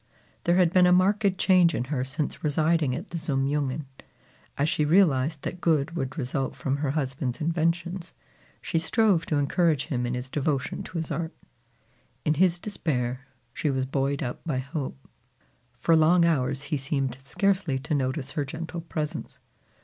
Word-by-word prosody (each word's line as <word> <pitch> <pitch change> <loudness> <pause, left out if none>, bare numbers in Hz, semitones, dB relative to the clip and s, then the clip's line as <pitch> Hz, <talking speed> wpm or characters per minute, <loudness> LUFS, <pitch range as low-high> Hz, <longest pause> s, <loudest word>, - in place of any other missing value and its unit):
There 175 - +4
had 180 -2 +4
been 180 -2 +6
a - - +5
marked 195 +2 +3
change 180 -3 +4
in - - -1
her 130 0 -2
since 135 +3 -4
residing 155 -2 +2
at 175 +9 -7
the 170 - -3
Zum 135 -4 0
Jungen. 145 0 -1 0.7
As 140 - +2
she 155 - +1
realized 150 -3 +3
that 180 - -5
good 160 0 +1
would 135 -2 -3
result 135 -1 -2
from 135 0 -1
her 145 -1 -1
husband's 130 -3 -2
inventions, 170 +2 -1 0.5
she 165 - 0
strove 180 0 +2
to 155 - 0
encourage 145 +1 +2
him 125 -6 -2
in 120 - -2
his 125 +1 -5
devotion 140 -2 -1
to - - -7
his 165 - -3
art. 165 -1 -3 0.9
In 150 - +3
his 175 +2 +3
despair, 135 - -2 0.3
she 150 - -1
was 130 -1 0
buoyed 135 +1 -1
up 120 - -5
by 150 -6 -2
hope. 135 - -4 0.8
For 165 +7 +3
long 170 +2 +5
hours 135 -4 +1
he 145 +1 -1
seemed 135 -2 -1
scarcely 185 0 0
to 140 +4 -3
notice 135 0 -1
her 145 +2 -1
gentle 165 +4 -6
presence. 155 -2 -5
150 Hz, 170 wpm, -26 LUFS, 135-170 Hz, 0.9 s, been